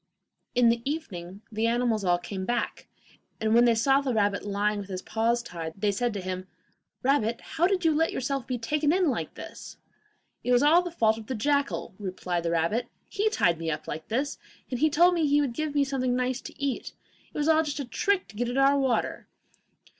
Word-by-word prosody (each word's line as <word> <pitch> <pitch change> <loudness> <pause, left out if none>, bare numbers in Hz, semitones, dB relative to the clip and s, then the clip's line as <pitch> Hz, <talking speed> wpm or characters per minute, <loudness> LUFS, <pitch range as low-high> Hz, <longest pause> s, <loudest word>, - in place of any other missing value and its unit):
In 245 -1 +5
the 230 0 +1
evening 205 - -5
the 220 +1 0
animals 235 -3 +1
all 175 -1 +3
came 190 +2 -6
back, 240 +4 -2 0.5
and 220 0 +1
when 240 +1 +6
they 235 -1 +4
saw 270 +5 +3
the 260 -4 -1
rabbit 205 -1 +1
lying 205 +1 0
with 200 -1 -7
his 185 -1 -5
paws 235 +2 0
tied, 165 -5 -6
they 205 +1 +1
said 240 +4 0
to 200 - -3
him: 185 0 -5 0.6
'Rabbit, 235 -4 +2
how 340 +2 0
did 370 -3 0
you 320 - +5
let 325 +2 +2
yourself 265 0 -2
be 255 - -1
taken 295 +6 +1
in 360 -3 +3
like - - -4
this?' - - -9 0.7
'It 250 - 0
was 245 +2 +5
all 320 +4 +6
the 355 - -4
fault 225 -9 +2
of 220 - -11
the 260 - -2
jackal,' 280 +3 0
replied 185 -3 -3
the 170 - -1
rabbit; 170 +8 0 0.2
'he 420 +1 +1
tied 170 - +2
me 165 -1 -2
up 150 - -4
like 155 - -5
this, 275 +6 -2 0.3
and 295 +5 +2
told 345 +4 +5
me 330 -3 +2
he 290 +1 +4
would 280 -5 0
give 305 +3 -3
me 285 - +4
something 260 -2 0
nice 255 +1 -1
to - - -11
eat. 280 -2 -2 0.4
It - - -9
was 295 0 0
all 320 -1 +5
a - - +3
trick 295 - 0
just - - -34
to - - -19
get 240 +2 -1
at 245 - -2
our 275 +1 +5
water. 260 -4 0
245 Hz, 220 wpm, -27 LUFS, 205-285 Hz, 0.7 s, when